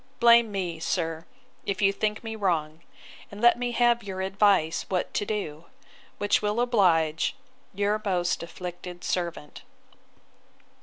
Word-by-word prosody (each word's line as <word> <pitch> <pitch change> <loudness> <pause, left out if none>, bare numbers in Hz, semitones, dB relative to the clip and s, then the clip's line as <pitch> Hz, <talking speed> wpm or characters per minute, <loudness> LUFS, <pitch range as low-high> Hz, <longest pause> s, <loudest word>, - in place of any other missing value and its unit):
—blame 235 -1 +6
me, 180 -5 -3
sir, 165 -1 -2 0.4
if 195 -1 -3
you 195 -1 +3
think 210 +2 -2
me 225 -1 -5
wrong; 165 -6 -1 0.5
and 200 - -10
let 240 +1 +6
me 245 0 -1
have 240 0 +3
your 190 -3 -6
advice 190 -4 +2
what 185 -2 -1
to 205 - -1
do; 170 -7 -4 0.5
which 205 0 +2
will 210 +2 0
oblige 180 - +2 0.4
'Your 205 +2 0
most 180 -4 0
afflicted 175 +1 -8
servant. 170 -4 -3
195 Hz, 135 wpm, -26 LUFS, 170-210 Hz, 0.5 s, blame